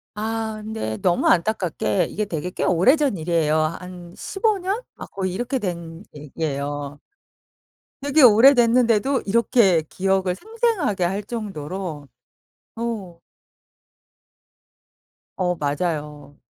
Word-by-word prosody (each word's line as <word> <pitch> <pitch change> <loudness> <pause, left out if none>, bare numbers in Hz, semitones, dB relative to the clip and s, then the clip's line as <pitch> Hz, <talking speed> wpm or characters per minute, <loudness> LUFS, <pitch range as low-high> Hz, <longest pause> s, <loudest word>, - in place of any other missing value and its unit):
아. 220 0 -3
근데 160 - -4
너무 175 -2 +1
안타깝게 180 -1 +1
이게 215 - -2
되게 175 -3 -4
꽤 - - -3
오래전 260 - +3
일이에요. 160 -2 +1
한 175 +2 -4
15 415 +1 0
년 390 +6 -2
막 - - -10
거의 185 -2 -3
이렇게 245 +6 -2
된 170 -4 -5
얘기예요. 145 -1 -4 1.0
되게 285 +2 +3
오래됐는데도 240 +1 +5
이렇게 200 -5 +3
기억을 190 -1 0
생생하게 435 - -1
할 195 +4 -1
정도로. 185 - -6 0.7
어. 210 -8 -5 2.2
어 180 -1 0
맞아요. 150 -1 -3
190 Hz, 220 characters per minute, -22 LUFS, 165-230 Hz, 2.2 s, 오래됐는데도